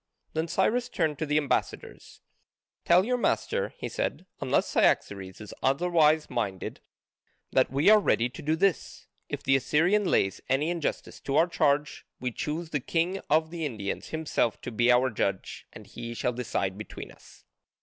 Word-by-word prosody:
Then 160 +1 -1
Cyrus 220 +8 +1
turned 155 -6 -1
to 155 - -2
the 150 +1 +2
ambassadors: 145 -3 -3 0.6
"Tell 180 +3 +5
your 250 +1 0
master," 485 - 0
he - - -4
said, 185 - -3
"unless 130 - +1
Cyaxares 95 -2 +1
is 105 - -9
otherwise 155 +1 +3
minded, 100 -6 -4 0.7
that - - +3
we 140 +3 0
are 215 - +8
ready 120 - +2
to 125 +5 -10
do 155 +2 +1
this: 190 +1 -1 0.2
if - - -5
the 135 - +3
Assyrian 170 +10 +2
lays 95 - +1
any 145 +5 +1
injustice 170 -3 -3
to 135 - -3
our 160 - +5
charge 150 -4 0 0.2
we 125 0 -2
choose 155 +6 -4
the 145 - 0
king 170 +8 -1
of 160 +2 +2
the 170 -2 -5
Indians 110 -9 -4
himself 155 -7 -1
to - - -6
be 120 +2 +3
our 125 +1 +3
judge, 100 -3 -3
and - - -12
he 120 0 -7
shall 125 - -1
decide 100 -5 -2
between 110 - -8
us." - - -19
150 Hz, 170 wpm, -28 LUFS, 120-170 Hz, 0.7 s, are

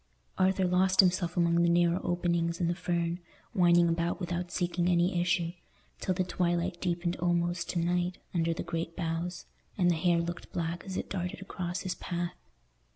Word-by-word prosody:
Arthur 190 0 +3
lost 185 +1 +2
himself 180 -2 +4
among 170 0 +3
the 170 - +4
narrow 175 +1 +3
openings 170 -1 0
in 175 - +1
the 170 - +1
fern, 170 -1 -1 0.3
winding 175 -3 +5
about 170 +2 0
without 180 -1 -3
seeking 175 -1 0
any 175 +1 +2
issue, 175 -1 +1 0.5
till 185 - -1
the 185 - +1
twilight 175 0 -1
deepened 175 -1 -1
almost 175 0 0
to - - -2
night 175 +1 0 0.2
under 165 -1 +1
the 165 - -3
great 165 0 -4
boughs, 170 +1 -3 0.3
and 175 -3 +4
the - - +2
hare 170 +1 +2
looked 175 +1 -5
black 170 0 -3
as 190 -1 -4
it - - -3
darted 180 -2 -3
across 180 -2 -4
his 185 - -2
path. 175 0 -3
175 Hz, 175 wpm, -30 LUFS, 170-180 Hz, 0.5 s, winding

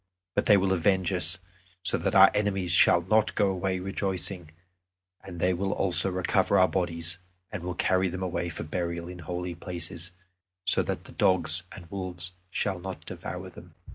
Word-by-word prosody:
But - - 0
they 105 - +7
will 95 0 +2
avenge 95 +1 +2
us, 85 -2 +1 0.5
so - - +2
that - - -1
our - - +9
enemies 100 -4 0
shall 85 0 +5
not 110 +4 +2
go 100 -2 +3
away 95 0 -1
rejoicing. 95 -2 -3 0.7
And 90 -3 -8
they 90 +2 +2
will 95 +2 -1
also 95 0 +3
recover 90 -1 +2
our 95 +1 +6
bodies, 85 -1 -3 0.3
and 105 - -5
will 90 0 -4
carry 95 +1 +2
them 95 +1 -4
away 85 -1 -2
for 85 - -6
burial 85 +1 -3
in 90 0 -8
holy 90 +1 -4
places, 85 -1 -6 0.6
so - - +5
that - - -3
the - - -13
dogs 85 -2 +2
and 90 - -10
wolves 90 -2 -4 0.2
shall 95 0 -1
not 95 +1 -7
devour - - -6
them." - - -14
90 Hz, 175 wpm, -28 LUFS, 85-95 Hz, 0.7 s, our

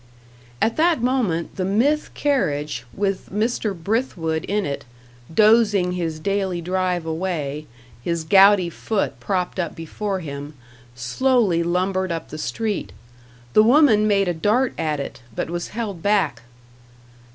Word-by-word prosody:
At 225 - +1
that 320 -6 +3
moment, 225 -12 0
the 185 - -1
Mythe 240 +11 +2
carriage, 150 - -1
with 195 -1 -2
Mr. 215 0 -1
Brithwood 165 -5 -1
in 205 0 -1
it, 140 - -4 0.5
dozing 210 -1 +4
his 165 -3 -3
daily 195 0 -1
drive 180 0 -1
away, 160 -3 -3 0.3
his 170 +3 -2
gouty 195 +1 +6
foot 205 +5 -2
propped 185 -1 -2
up 170 -3 -2
before 190 +4 -4
him 145 -1 -7 0.4
slowly 190 - +2
lumbered 185 +2 0
up 165 -1 -4
the 155 - -7
street. 210 - -3 0.6
The - - +7
woman 225 -3 +5
made 200 -2 +2
a 175 - +1
dart 215 +10 +1
at 155 -2 -1
it, 140 - -6
but - - -3
was 175 0 -3
held 210 -6 -5
back. 200 - +1
185 Hz, 135 wpm, -22 LUFS, 165-215 Hz, 0.6 s, The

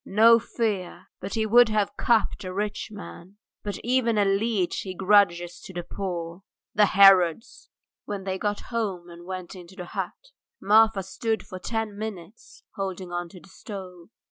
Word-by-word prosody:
No 230 +3 +6
fear, 215 -5 -3
but 195 +4 -5
he 220 -1 +1
would 240 +2 +6
have 205 -1 0
cupped 225 -4 +1
a 185 - -5
rich 210 +2 -3
man, 200 -2 -11 0.2
but 205 -1 -4
even 240 -2 +1
a 205 - +3
leech 195 -1 0
he 185 -1 -6
grudges 185 -3 +3
to 190 - -11
the 175 -1 -4
poor. 175 -1 -5 0.3
The 210 0 +4
Herods!" 190 -1 +4 0.4
When 200 -2 -5
they 190 0 -3
got 205 0 -2
home 190 -7 -3
and 170 0 -12
went 185 -2 -6
into 180 0 -12
the 180 - -7
hut, - - -6 0.3
Marfa 220 -1 +4
stood 220 +3 -3
for 185 - -8
ten 225 +1 -3
minutes 210 -1 -9
holding 190 -3 -5
on 175 0 -4
to 180 - -13
the 195 - -19
stove. 185 -5 -10
195 Hz, 170 wpm, -25 LUFS, 180-215 Hz, 0.4 s, No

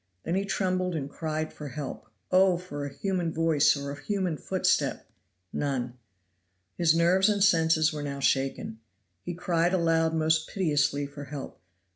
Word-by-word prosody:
Then 165 - -2
he 195 +2 0
trembled 185 -2 -1
and 140 -3 -3
cried 155 +1 -4
for 150 - -8
help. 140 0 -6 0.2
Oh! 185 -1 +5
for 145 -5 -6
a - - -8
human 180 0 -2
voice 160 -3 +3
or 140 0 -5
a 145 0 -8
human 190 -4 -1
footstep! 145 - 0 0.5
none. 130 -4 -2 0.8
His 165 -2 +3
nerves 180 +4 +4
and 205 -2 +2
senses 160 -3 +4
were 150 - -4
now 140 -1 -4
shaken. 135 -4 0 0.4
He 175 - -5
cried 175 0 +1
aloud 165 -2 +2
most 160 0 +1
piteously 145 -5 +1
for 145 0 -9
help. 140 0 -7
"Mr. - - -43
160 Hz, 160 wpm, -28 LUFS, 145-180 Hz, 0.8 s, Oh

